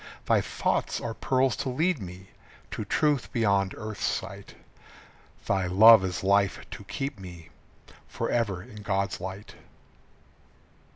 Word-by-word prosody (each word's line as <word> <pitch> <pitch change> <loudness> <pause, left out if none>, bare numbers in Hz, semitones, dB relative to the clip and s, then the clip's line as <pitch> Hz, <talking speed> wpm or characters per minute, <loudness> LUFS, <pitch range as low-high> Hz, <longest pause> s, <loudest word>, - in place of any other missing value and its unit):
Thy - - +3
thoughts - - -1
are 115 - -4
pearls 130 0 +1
to 135 - -2
lead 160 +2 0
me 95 +1 -9 0.4
To - - -4
truth 145 +6 0
beyond 100 -4 +1
earth's 110 -1 -6
sight. - - -4 0.9
Thy 95 -2 0
love 110 +3 +8
is 90 -1 -3
life 100 0 +2
to - - -8
keep 135 0 -4
me 85 -3 -11 0.6
Forever 100 -6 -1
in 115 -2 -13
God's 100 -1 -1
light. 95 +3 -7
100 Hz, 125 wpm, -27 LUFS, 95-120 Hz, 0.9 s, love